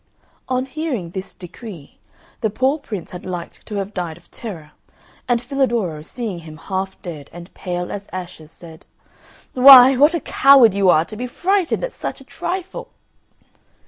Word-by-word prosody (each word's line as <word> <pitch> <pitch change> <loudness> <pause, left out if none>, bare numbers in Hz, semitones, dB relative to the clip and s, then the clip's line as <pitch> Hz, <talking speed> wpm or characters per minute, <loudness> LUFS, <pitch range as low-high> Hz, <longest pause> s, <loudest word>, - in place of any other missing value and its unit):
On 255 0 0
hearing 265 - -4
this 190 +1 -6
decree 180 - -11 0.4
the 220 - 0
poor 260 +8 0
Prince 210 - -7
had 180 - -8
liked 175 -2 -7
to 210 - -6
have 200 +1 -4
died 175 -4 -4
of - - -23
terror, 165 -10 -8 0.6
and 240 -1 +2
Filadoro, 235 - -1
seeing 200 +2 -5
him 155 -2 -11
half 190 +2 -4
dead 155 -6 -8
and 175 +1 -12
pale 180 -1 -4
as 200 0 -7
ashes, 175 -4 -8
said, 165 -2 -14 0.7
"Why! 260 0 +9
What 295 +6 +4
a - - 0
coward 270 -9 +5
you 195 -1 +2
are 160 -1 +4
to 215 - -10
be 250 +3 -4
frightened 375 - 0
at - - -2
such - - -6
a - - -14
trifle." 375 0 -5
200 Hz, 165 wpm, -20 LUFS, 175-255 Hz, 0.7 s, Why